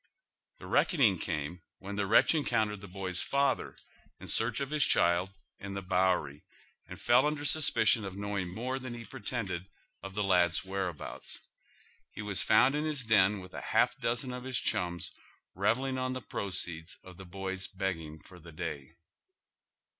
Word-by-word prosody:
The - - -11
reckoning 120 - +3
came 80 +1 -3 0.2
when 100 +1 -7
the 100 -1 0
wretch 110 - +6
encountered 110 -9 +1
tlie 100 -3 -10
boy's 95 -1 -2
father, 140 -1 0 0.4
in - - -10
search 115 +2 +1
of 140 0 -3
his 150 -2 +2
child, 85 -2 +3 0.3
in 100 0 -6
the 100 - -4
Bowery, 90 -6 +1 0.4
and - - -9
fell 125 +4 +4
under 150 -1 -2
suspicion 115 -8 +4
of 95 -1 -6
knowing 100 -2 -2
more 125 +7 -3
than 130 -2 -6
lie 115 - -7
pretended 105 -7 -4 0.3
of 95 +1 -8
the 105 - 0
lad's 90 -2 +3
whereabouts. 95 -4 -5 0.7
He 110 - -7
was 100 -2 -2
found 120 +5 +5
in 150 +1 0
his 150 -4 -1
den 105 -3 +4
with 90 0 -12
a - - -5
half - - +2
dozen 120 +2 -1
of 125 0 -6
his 130 -1 -2
ehums 85 -6 -1 0.4
revelling 130 +7 +1
on 130 0 -1
the 130 - -4
proceeds 90 -6 -4
of 90 -2 -13
the 95 - -10
boy's 95 +1 -3
begging 85 -5 -4
for 90 -1 -14
the 85 0 -12
day. 75 -1 -6
100 Hz, 170 wpm, -31 LUFS, 90-125 Hz, 0.7 s, wretch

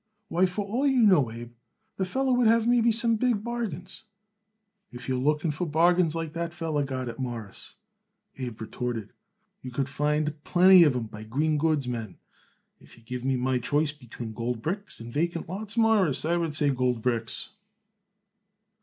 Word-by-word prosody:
"Why, 180 +2 +3
for 195 +3 -3
all 245 +8 0
you 260 -3 +4
know, 175 - +5
Abe, 120 +1 -9 0.4
the 190 - 0
feller 260 +6 0
would 245 -2 +3
have 225 0 +4
maybe 235 -1 +4
some 230 0 +2
big 230 -3 +1
bargains." 210 -7 -4 0.9
"If 125 0 -9
you 130 - 0
are - - -1
looking 150 +4 +1
for 170 +4 -3
bargains 165 +1 +3
like 165 -2 -4
that 170 0 -3
feller 160 -4 -1
got 130 -2 -4
it, 115 +1 -6
Mawruss," 115 -6 -5 0.6
Abe 120 -4 -5
retorted, 115 -1 -4 0.5
"you 130 - -7
could 130 +2 -2
find 150 +1 -1
plenty 185 +1 +7
of 145 -4 +2
'em 120 -2 -2
by 105 0 -9
green 150 +7 0
goods 155 -4 +1
men. 115 -6 -5 0.6
If - - -18
you 115 - -19
give 125 +1 -6
me 135 0 +1
my 130 0 0
choice 145 +5 +1
between 120 -5 -9
gold 115 +1 -3
bricks 200 +5 -3
and 115 +1 -9
vacant 170 +2 -1
lots, 205 +5 -5
Mawruss, 210 - +3
I 170 +2 +2
would 165 -3 -1
say 145 -2 +2
gold 125 -3 0
bricks." 115 -2 -1
150 Hz, 180 wpm, -27 LUFS, 125-185 Hz, 0.9 s, plenty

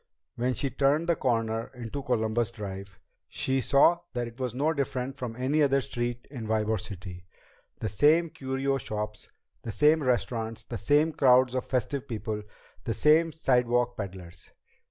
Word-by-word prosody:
When 125 +1 0
she 140 - -1
turned 140 +5 +2
the 170 - +3
corner 115 -4 0
into 125 +3 -5
Columbus 115 -3 0
Drive, 100 -4 -8 0.3
she 135 0 0
saw 140 +7 +4
that 120 -1 -1
it 120 +2 -12
was 125 -2 -3
no 150 +5 +1
different 135 -2 -2
from 120 -3 -5
any 135 +5 +1
other 140 -1 +4
street 120 -2 -4
in 120 -6 -6
Ybor 110 -2 0
City. 90 -2 -9 0.5
The 110 - -1
same 155 - +3
curio 135 +1 -1
shops, 105 -2 -5 0.3
the 115 - -5
same 150 +7 +4
restaurants, 115 -4 -1
the 115 0 -6
same 150 +2 +3
crowds 130 -3 +4
of 130 - -2
festive 135 +2 -2
people, 110 -2 -4 0.4
the - - -2
same 160 +2 +4
sidewalk 120 -5 +1
peddlers. 90 -5 -8
125 Hz, 155 wpm, -28 LUFS, 110-140 Hz, 0.5 s, saw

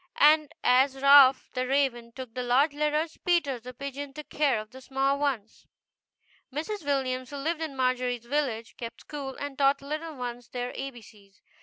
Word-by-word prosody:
And 305 0 +5
as 265 +2 +4
Ralph, 275 -1 +7
the 255 -1 -1
raven, 255 -4 0
took 255 -1 -9
the 250 - -3
large 260 +5 +3
letters, 300 +2 -1
Peter, 320 -8 +1
the 250 +2 -9
pigeon, 280 +2 -6
took 300 +1 -9
care 280 -7 +2
of 215 +1 -9
the 260 - -12
small 270 +1 0
ones. 250 -7 -3 0.8
Mrs. 325 +8 -4
Williams, 255 -3 -1
who 285 - -7
lived 320 +4 -2
in 310 -4 -4
Margery's 250 -2 0
village, 240 -4 -2
kept 235 -1 -7
school, 275 -3 -6
and 285 -1 -6
taught 275 0 +4
little 310 +2 -5
ones 245 -2 -6
their 245 0 -4
A 270 +1 -4
B 240 -4 -13
C's. 200 -2 -19
270 Hz, 180 wpm, -28 LUFS, 245-285 Hz, 0.8 s, Ralph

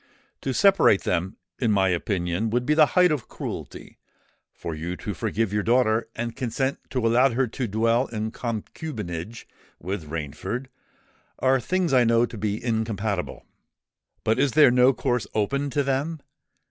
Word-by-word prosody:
To 135 - -2
separate 195 - +4
them, 90 +2 -1 0.2
in 115 -4 +2
my 95 -2 +3
opinion, 90 +3 -1
would 120 +2 0
be 150 - +3
the 155 -1 +6
height 180 -2 +6
of 140 -7 -2
cruelty: - - -7 0.5
for 85 - -6
you 85 +4 -4
to 105 - -5
forgive 110 0 -1
your 105 - +1
daughter 115 0 +2
and 115 0 -4
consent 130 +2 -2
to 125 -3 -1
allow 125 +4 +4
her 130 +2 +1
to 125 +2 -4
dwell 115 +4 +1
in 110 -1 -4
concubinage 110 - -5 0.3
with 90 -3 -5
Rainford, 80 - -4 0.7
are 130 0 +3
things 180 +5 0
I 125 -2 +6
know 115 0 +4
to 120 - -9
be 105 +1 -2
incompatible. 110 -4 -2 0.8
But 110 +3 +1
is 140 -2 +2
there 150 -5 +7
no 125 +1 +5
course 125 -2 -1
open 140 +7 0
to 145 +2 0
them? 140 +4 -1
115 Hz, 160 wpm, -25 LUFS, 105-130 Hz, 0.8 s, there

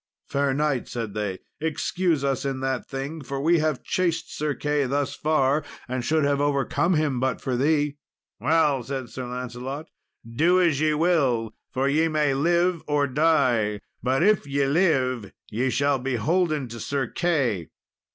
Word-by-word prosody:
"Fair 140 0 +1
knight," 140 -2 0
said 115 -4 -4
they, 105 -3 -2 0.2
"excuse 160 0 0
us 135 -1 0
in 135 -1 -2
that 130 -2 -2
thing, 140 +4 -5
for 140 +1 -4
we 165 +4 +3
have 155 -3 -1
chased 170 -3 -1
Sir 150 -1 -1
Key 145 -1 0
thus 140 +2 -1
far, 150 -1 +1 0.2
and 130 0 -3
should 155 +4 +2
have 140 0 +1
overcome 145 +5 +1
him 150 -5 +1
but 130 0 0
for 130 - -2
thee." 145 +2 +1 0.4
"Well," 145 +1 +2
said 130 0 -5
Sir 130 -1 -6
Lancelot, 125 +4 -5 0.4
"do 165 +11 +3
as 165 -5 +2
ye 155 -1 +2
will, 135 -10 +1 0.2
for 130 +1 0
ye 155 +4 +3
may 150 -3 +1
live 170 +4 +2
or 145 -1 +2
die; 125 -7 +2 0.2
but, 130 +6 +1
if 205 -6 +3
ye 140 0 +1
live, 135 - +1 0.2
ye 125 +5 0
shall 140 +2 +1
be 130 0 -2
holden 155 +1 +1
to 115 +1 -8
Sir 140 +2 -1
Key." 125 - 0
140 Hz, 165 wpm, -25 LUFS, 130-155 Hz, 0.4 s, we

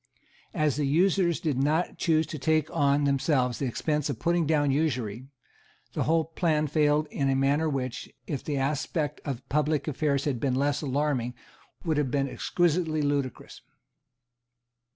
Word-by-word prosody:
As 155 -4 +1
the 145 -2 0
usurers 175 +2 +2
did 145 -6 -1
not 155 +5 0
choose 160 -2 +2
to 155 0 -7
take 155 +2 +1
on 145 -2 +3
themselves 135 -3 +1
the 135 - -1
expense 150 +4 -1
of - - -2
putting 170 -2 +1
down 145 -3 +2
usury, 130 -5 -1 0.7
the - - -1
whole 160 0 +2
plan 160 -2 0
failed 150 0 +2
in 140 -1 0
a 135 - +2
manner 140 +4 +2
which, 130 -4 -3 0.2
if 140 - -4
the 145 -2 -2
aspect 145 +3 -1
of 135 -4 -5
public 150 +1 0
affairs 140 -1 0
had 135 -5 -1
been 130 +1 0
less 140 +2 +1
alarming, 135 -4 -1 0.5
would 160 -3 +1
have 145 -3 +1
been 135 +1 0
exquisitely 160 +1 0
ludicrous. 140 -3 -2
145 Hz, 155 wpm, -27 LUFS, 135-155 Hz, 0.7 s, on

